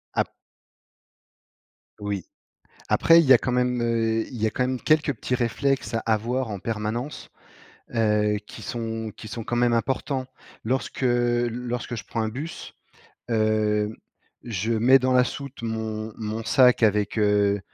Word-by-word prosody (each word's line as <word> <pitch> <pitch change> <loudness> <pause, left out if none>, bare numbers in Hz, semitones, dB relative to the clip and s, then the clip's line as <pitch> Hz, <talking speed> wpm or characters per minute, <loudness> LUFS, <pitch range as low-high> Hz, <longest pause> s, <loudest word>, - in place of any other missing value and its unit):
Ap - - +1 1.7
Oui. 100 -3 -3 0.6
Après, 165 0 +6
il 165 - +4
y 130 - +8
a - - +8
quand 125 - -3
même, 125 -1 +1
heu, 115 -1 +1
il 120 -4 -8
y - - +3
a - - +3
quand 125 +4 -1
même 130 -1 -1
quelques 155 -2 +2
petits 125 +2 -2
réflexes 130 +2 0
à 115 - +1
avoir 115 +3 -1
en 100 -2 -4
permanence, 115 +6 -4 0.6
heu, 105 -2 +2
qui 110 - -10
sont 115 0 -4
qui 110 - -9
sont 115 +1 -6
quand 120 - -3
même 120 0 +3
importants. 130 +2 -1 0.4
Lorsque 130 +3 -2
lorsque 120 0 0
je 105 - -6
prends 115 - -3
un 110 - -1
bus, 150 +9 -7 0.6
hem, 110 -1 +1 0.5
je 110 0 -2
mets 125 +4 +6
dans 130 0 +1
la 125 0 +5
soute 140 -3 -7
mon 110 -1 -3
mon 110 0 -4
sac 125 -2 +5
avec, 105 0 +2
heu, 105 -1 +3
115 Hz, 155 wpm, -25 LUFS, 110-125 Hz, 1.7 s, y